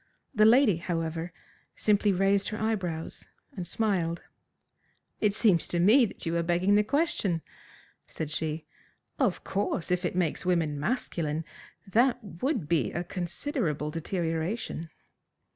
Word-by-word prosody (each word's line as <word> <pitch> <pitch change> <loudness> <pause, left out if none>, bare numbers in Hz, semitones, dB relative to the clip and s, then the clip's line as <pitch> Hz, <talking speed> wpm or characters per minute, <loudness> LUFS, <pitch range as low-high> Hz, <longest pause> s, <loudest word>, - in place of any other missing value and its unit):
The 215 0 +5
lady, 225 - +6
however, 165 0 -3 0.4
simply 205 -1 +3
raised 195 +1 +2
her 215 - -5
eyebrows 185 -7 -2 0.3
and 180 -3 -3
smiled. 175 -4 0 1.0
"It 210 - +3
seems 200 -5 +3
to 175 - -1
me 225 +8 +6
that - - -8
you 165 0 -1
are - - +2
begging 175 +4 +2
the 210 +1 +5
question," 240 - 0 0.6
said 155 -2 -5
she. 155 0 -3 0.5
"Of - - +1
course, 195 -3 -2
if 180 0 +1
it 175 - -1
makes 175 -4 0
women 165 -5 +1
masculine 160 - -2 0.4
that 235 +6 +3 0.2
would 255 - 0
be 150 -10 +1
a 175 - -2
considerable 175 - -2
deterioration." 165 +1 -3
180 Hz, 130 wpm, -28 LUFS, 165-210 Hz, 1.0 s, lady